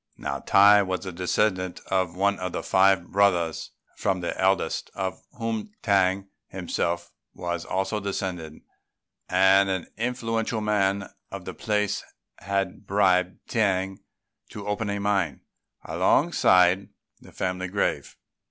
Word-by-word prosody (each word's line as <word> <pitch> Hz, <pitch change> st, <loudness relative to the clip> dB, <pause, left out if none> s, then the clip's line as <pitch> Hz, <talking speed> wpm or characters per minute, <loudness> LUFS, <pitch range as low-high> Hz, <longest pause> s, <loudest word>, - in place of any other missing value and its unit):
Now 70 Hz, 0 st, -4 dB
Tai 100 Hz, +1 st, +6 dB
was 95 Hz, -1 st, -3 dB
a 95 Hz, -, -4 dB
descendant 90 Hz, +1 st, 0 dB
of 95 Hz, -3 st, +1 dB
one 100 Hz, +2 st, +1 dB
of 90 Hz, -1 st, -4 dB
five 95 Hz, -2 st, +3 dB
brothers, 90 Hz, -5 st, +2 dB, 0.3 s
from 95 Hz, -2 st, 0 dB
the 85 Hz, -, -3 dB
eldest 95 Hz, -3 st, 0 dB
of 95 Hz, -1 st, -3 dB, 0.2 s
whom 115 Hz, -, -3 dB
T'ang 95 Hz, -2 st, +2 dB, 0.2 s
himself 85 Hz, -1 st, -3 dB, 0.2 s
was 85 Hz, -1 st, -4 dB
also 95 Hz, +3 st, -1 dB
descended; 95 Hz, -5 st, -4 dB, 0.7 s
and 95 Hz, +1 st, +5 dB
an 95 Hz, -2 st, -1 dB
influential 115 Hz, -1 st, -1 dB
man 100 Hz, -2 st, +1 dB, 0.2 s
of -, -, -8 dB
the -, -, -5 dB
place 105 Hz, -1 st, -1 dB, 0.4 s
had 100 Hz, -1 st, -3 dB
bribed 95 Hz, -2 st, +2 dB
T'ang 95 Hz, -4 st, 0 dB, 0.5 s
to 105 Hz, -, -8 dB
open 105 Hz, +1 st, -2 dB
a 100 Hz, 0 st, -2 dB
mine 100 Hz, -8 st, 0 dB, 0.4 s
alongside 90 Hz, +1 st, +3 dB, 0.3 s
the -, -, -16 dB
family 90 Hz, 0 st, -3 dB
grave. 100 Hz, +2 st, -2 dB
95 Hz, 125 wpm, -25 LUFS, 90-100 Hz, 0.7 s, Tai